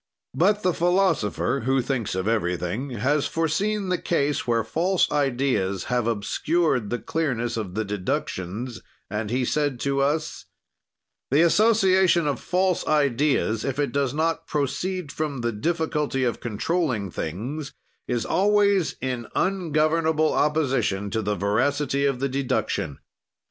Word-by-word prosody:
But 200 +9 +2
the 180 - +2
philosopher, 150 - +1
who 135 0 +3
thinks 125 -6 -2
of 95 +2 -2
everything, 100 +3 -1
has 135 +5 0
foreseen 190 +5 -1
the 180 - 0
case 145 -5 0
where 115 -1 +2
false 175 - +1
ideas 125 -9 0
have 120 -2 +1
obscured 120 +3 0
the 120 - -1
clearness 125 -6 -2
of 100 -5 -4
the 110 0 -1
deductions, 100 +3 -3 0.3
and 105 0 -2
he 125 +2 0
said 145 -2 0
to 140 0 0
us: 155 +3 -1 0.8
"The 145 +4 +4
association 190 -3 +4
of 145 -2 -1
false 185 0 0
ideas, 140 -6 +2
if 135 -1 -2
it 145 -1 0
does 140 -2 0
not 165 +1 -1
proceed 155 +3 -2
from 145 -5 -3
the 120 0 0
difficulty 150 +2 -1
of 120 -2 0
controlling 120 - -1
things, 125 - -4 0.4
is 120 -2 -1
always 200 -2 +2
in 125 -3 -3
ungovernable 160 -3 +1
opposition 135 -10 +1
to 110 - 0
the 105 0 -1
veracity 140 +8 +1
of 135 -3 -1
the 135 - 0
deduction. 130 - -1
140 Hz, 135 wpm, -24 LUFS, 115-165 Hz, 0.8 s, The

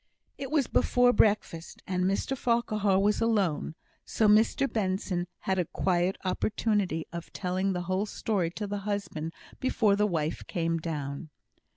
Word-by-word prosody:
It 270 -1 -4
was 295 -4 +2
before 245 +1 +3
breakfast, 205 -6 +1
and 185 -1 0
Mr 195 +8 0
Farquhar 215 -5 +1
was 205 +3 +2
alone; 195 -9 +1 0.3
so 220 - +1
Mr 220 +6 +4
Benson 185 -5 -1
had 190 -1 0
a 180 - +1
quiet 180 +2 0
opportunity 200 -4 0
of 170 0 -7
telling 190 +1 -1
the 180 -1 -2
whole 185 +4 -1
story 200 -6 -1
to 210 +5 -5
the 205 0 -3
husband 200 -6 -3 0.3
before 220 -5 +2
the 210 +1 +2
wife 160 -5 -2
came 165 -1 -1
down. 150 -1 -4
195 Hz, 150 wpm, -29 LUFS, 175-215 Hz, 0.3 s, Mr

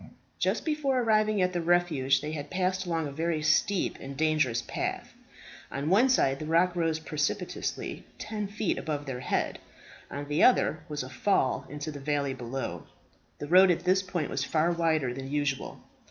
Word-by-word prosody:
Just - - 0
before 295 -4 +1
arriving 215 -3 +3
at 180 0 0
the 175 - -1
refuge, 160 -6 +2
they 150 - -4
had 145 -2 -5
passed 185 0 -1
along 165 -2 0
a - - -6
very 160 +1 -1
steep 170 +5 +2
and 135 0 -7
dangerous 150 -7 +1
path. - - -4 0.6
On 140 +4 -2
one 230 +7 +5
side 135 - +3
the 155 - -5
rock 170 +2 +3
rose 165 -2 +1
precipitously, 160 +4 -3
ten 210 -2 -4
feet 205 -1 -1
above 145 -2 -3
their 130 -3 -4
heads. 125 - -1 0.5
On 145 0 -5
the 150 +1 0
other, 245 -10 +4
was 150 -3 -3
a 130 - -8
fall 135 -4 +1
into 145 +2 -5
the 145 - -8
valley 140 -1 -1
below. 130 +2 -5 0.5
The - - -5
road 185 +4 +7
at 175 -1 +1
this 185 +1 +3
point 180 -5 -3
was 135 - -1
far 160 +2 +1
wider 160 -7 +1
than 135 +1 -6
usual. 145 -1 -2
155 Hz, 180 wpm, -28 LUFS, 145-180 Hz, 0.6 s, road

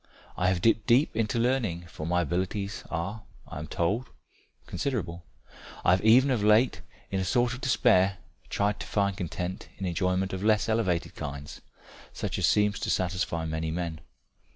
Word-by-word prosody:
I 90 - +1
have 90 -2 -1
dipped 115 -2 +3
deep 125 +4 +4
into 110 0 0
learning, 115 -8 0
for 80 -2 -7
my 90 +1 +2
abilities 95 +5 -2
are, 100 +7 -3 0.3
I - - -7
am 75 - -6
told, 100 +11 -1 0.6
considerable; 90 -11 -3 0.6
I - - +6
have 95 - +3
even 125 +5 +6
of 115 -5 +1
late 110 +4 +4 0.3
in 95 - 0
a - - 0
sort 120 +4 +2
of 125 - -7
despair 100 -7 +3 0.3
tried 100 0 0
to - - -6
find 100 -2 +1
content 90 +1 -5
in 95 - -4
enjoyment 90 +2 0
of 95 +1 -4
less 110 0 +3
elevated 105 -7 0
kinds, 70 0 -7 0.5
such - - -3
as - - +3
seems 105 -1 +2
to - - -3
satisfy 90 -2 -1
many 80 0 -2
men. 80 -1 -3
95 Hz, 170 wpm, -28 LUFS, 85-110 Hz, 0.6 s, I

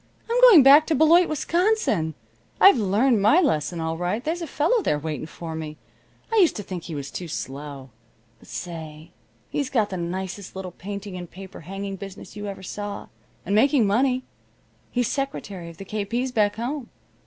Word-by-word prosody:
I'm 475 +2 +1
going 445 - +9
back 285 +3 +8
to 320 - +2
Beloit, 330 +5 +5
Wisconsin. 310 - +1 0.4
I've 390 -10 +7
learned 215 +3 +2
my 215 - +5
lesson 175 - 0
all 160 0 -2
right. 180 +7 -1
There's 335 +3 -2
a 335 - -4
fellow 320 - +1
there 150 - +1
waiting 155 0 -5
for 165 0 -7
me. 155 -1 -6 0.6
I - - +3
used 365 -6 +5
to 210 - -5
think 180 -3 -6
he 165 - -6
was 140 -1 -6
too 180 - -6
slow. 140 -2 -7 0.5
But - - -19
say, 160 -2 -7 0.4
he's 285 -2 -1
got 215 -5 +1
the 185 - -3
nicest 185 +3 -5
little 190 -1 -6
painting 200 +1 -7
and 175 -2 -8
paper 190 0 -11
hanging 195 +3 -6
business 195 +2 -10
you 205 0 -5
ever 195 -1 -7
saw, 205 +1 -6 0.4
and 200 - -1
making 250 +2 +4
money. 255 +5 +2 0.7
He's 245 -2 0
secretary 205 -11 -4
of 165 - -13
the 195 - -9
K. 210 +1 -3
P.'s 245 +5 -2
back 210 -4 +2
home. 250 +3 -4
200 Hz, 185 wpm, -24 LUFS, 175-270 Hz, 0.7 s, going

